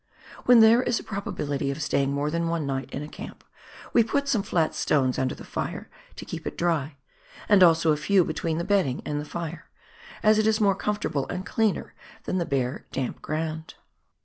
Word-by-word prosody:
When 245 -2 +7
there 225 +2 +7
is 240 - 0
a - - -9
pro* 215 -3 -4
bability 145 -7 -3
of 140 - -6
staying 140 -2 0
more 145 +2 -1
than 170 +1 -1
one 165 -2 -1
night 135 -1 -3
in 145 - -5
a - - -7
camp, - - -10 0.5
we 235 - +6
put 280 +5 -1
some 235 -7 +2
flat 175 -6 0
stones 130 -4 +1
under 130 -1 -1
the - - -11
fire - - -5 0.2
to - - -8
keep - - -6
it - - -6
dry, 160 -4 0 0.5
and 205 -2 +5
also 165 -2 +6
a 150 - +2
few 185 +3 +3
between 160 0 -2
the 170 - -1
bedding 185 -9 +1
and 145 0 -2
the - - -7
fire, 170 0 -6 0.5
as 215 0 +5
it 215 - +2
is 220 0 +2
more 200 -2 +4
comfortable 195 -8 -2
and 185 0 -5
cleaner 215 +4 0 0.3
than 185 - -1
the 170 - -2
bare, 130 -1 -2
damp 130 -2 -3
ground. 160 +1 -4
165 Hz, 205 wpm, -26 LUFS, 145-205 Hz, 0.5 s, When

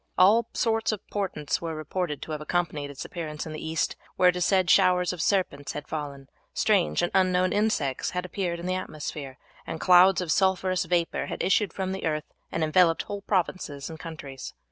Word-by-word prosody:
All 215 +5 +5
sorts 225 -2 +1
of 215 -2 -6
portents 185 -8 -2
were 165 -1 -4
reported 155 0 -3
to - - -7
have 150 -1 -4
accompanied 150 -3 -1
its 140 -1 -7
appearance 155 -3 -5
in 160 - -6
the 155 - -6
East; 160 0 -1 0.2
where 180 - +5
it - - +2
was 180 0 -1
said 185 -1 +3
showers 180 +1 +4
of 175 - -4
serpents 175 -8 0
had 150 - -6
fallen, 140 -3 -5 0.3
strange 75 0 +2
and 175 - 0
unknown 185 -1 +3
insects 205 -11 0
had 180 0 -3
appeared 180 -2 -3
in 170 - -7
the 185 - 0
atmosphere, 150 -6 -5 0.3
and 160 - -4
clouds 185 +1 +6
of 180 -3 -2
sulphurous 190 -1 +2
vapour 170 0 0
had - - -4
issued 195 0 +2
from 190 +1 -3
the 190 - -4
earth 155 -1 -1 0.3
and 165 - -1
enveloped 165 +1 +3
whole 205 0 -6
provinces 175 -7 -2
and 160 - -9
countries. 145 -5 -8
175 Hz, 195 wpm, -27 LUFS, 155-185 Hz, 0.3 s, clouds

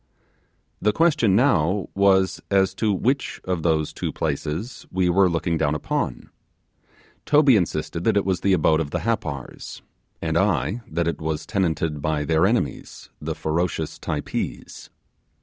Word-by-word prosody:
The 105 - +2
question 140 - +3
now 100 - +2
was 95 -1 +3
as 95 -1 +3
to 110 -2 0
which 130 +8 -1
of 90 -3 -2
those 80 -2 0
two - - -3
places 80 - -4
we 90 -1 +1
were 95 +1 +4
looking 85 -1 -1
down 75 -1 +1
upon. 75 - -3 1.0
Toby 145 -4 +5
insisted 85 -3 -1
that 110 -2 +3
it 100 - +1
was 95 -2 0
the 100 - +3
abode 80 -2 +3
of 75 - -3
the - - -3
Happar, 75 - -3 0.6
and 80 0 0
I 95 - 0
that 85 +1 -1
it 85 - -2
was 80 -1 -3
tenanted 80 -6 -1
by 75 0 -1
their 80 +4 +3
enemies 120 +3 -3
the - - -3
ferocious 80 0 -2
Typees. - - -4
90 Hz, 150 wpm, -23 LUFS, 80-100 Hz, 1.0 s, Toby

